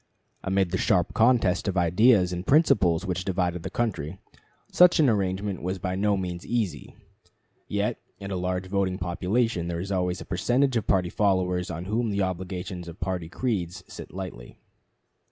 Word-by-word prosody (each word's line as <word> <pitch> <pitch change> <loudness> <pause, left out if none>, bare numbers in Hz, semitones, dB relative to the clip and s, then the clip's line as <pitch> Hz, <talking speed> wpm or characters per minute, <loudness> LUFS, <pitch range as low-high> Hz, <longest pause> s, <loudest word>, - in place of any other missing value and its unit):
Amid 95 -2 +1
the 95 - -1
sharp 90 -2 +2
contest 110 -6 +3
of 95 -1 -1
ideas 90 +2 +4
and 90 0 -4
principles 100 - +4
which 90 -1 -2
divided 90 -2 -1
the - - -5
country, 95 -8 -2 0.5
such 180 -1 +6
an 150 - +5
arrangement 100 -3 0
was 95 +2 -2
by 90 0 -3
no 100 +1 +1
means 90 -2 -4
easy; 115 -6 -3 0.7
yet - - -1 0.2
in 100 0 -7
a - - -1
large 90 0 -2
voting 95 -1 -1
population 90 +2 -1
there 85 -1 -3
is 95 +3 -5
always 90 -1 0
a - - -8
percentage 125 +8 +1
of 110 -4 -1
party 90 -3 +2
followers 90 -3 +1
on 85 0 -5
whom 110 +3 0
the 100 -1 0
obligations 90 -1 -4
of 85 +1 -10
party 90 -4 -3
creeds 90 -6 -2
sit - - -10
lightly. 90 -11 -8
95 Hz, 170 wpm, -26 LUFS, 90-105 Hz, 0.7 s, such